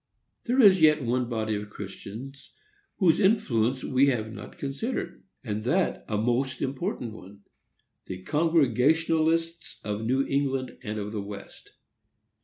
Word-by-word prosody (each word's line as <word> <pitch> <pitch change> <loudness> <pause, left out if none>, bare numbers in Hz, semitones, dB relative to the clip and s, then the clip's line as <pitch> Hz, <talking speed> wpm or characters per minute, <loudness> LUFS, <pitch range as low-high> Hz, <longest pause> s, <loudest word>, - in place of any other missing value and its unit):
There 250 +2 +1
is 195 -7 +7
yet 150 -2 +5
one 125 +1 0
body 110 -2 -1
of 105 0 -4
Christians 110 +7 -9 0.4
whose 175 -5 +4
influence 130 - +2
we 135 +2 +3
have 110 -5 -1
not - - -10
considered, 145 - -4 0.2
and 105 -3 -3
that 170 +10 0
a 105 - -1
most 125 +4 0
important 135 - -3
one,—the 95 -2 -13
Congregationalists 160 - +2
of 105 0 -3
New 130 +4 +1
England 135 -2 -1
and 105 -2 -4
of 105 0 -4
the 105 -2 -3
West. 100 0 -10
130 Hz, 130 wpm, -27 LUFS, 110-160 Hz, 0.4 s, is